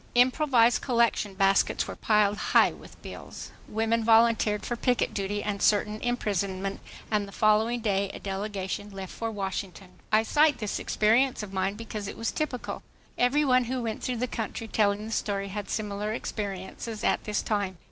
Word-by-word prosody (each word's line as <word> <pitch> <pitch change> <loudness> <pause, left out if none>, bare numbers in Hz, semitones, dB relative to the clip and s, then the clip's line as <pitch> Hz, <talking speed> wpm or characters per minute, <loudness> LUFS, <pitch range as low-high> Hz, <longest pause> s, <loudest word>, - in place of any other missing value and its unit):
Improvised 250 -1 +4
collection 235 -5 +1
baskets 195 0 +2
were - - -6
piled 210 -2 +2 0.2
high - - +7
with - - -14
bills. - - -9 0.2
Women 225 +1 0
volunteered 225 -2 +4
for 240 - -2
picket 245 +1 +1
duty 205 +1 -2
and 200 -1 -3
certain 210 +1 +2
imprisonment, 200 -5 -1 0.3
and 210 -2 +1
the - - -11
following 220 +3 +2
day 200 -2 0
a - - -7
delegation 195 0 -4
left 195 -2 -8
for 230 - -3
Washington. 195 -2 -5 0.2
I 215 +1 +5
cite 295 +3 +3
this 210 -3 -3
experience 230 +3 +2
of 195 -2 -8
mine 190 +1 0
because 215 -2 -6
it - - -7
was 230 - -1
typical. 285 -6 -3 0.3
Every 285 +5 +2
one 255 -2 +4
who 250 +1 -2
went 220 -2 -3
through 250 -1 -2
the 245 - 0
country 225 -1 -4
telling 210 -1 +1
the 220 - -7
story 200 -2 -2
had 205 +1 -5
similar 210 0 -2
experiences 205 +1 -5
at - - +1
this 210 -1 -1
time. 200 -4 -1
215 Hz, 170 wpm, -27 LUFS, 200-230 Hz, 0.3 s, high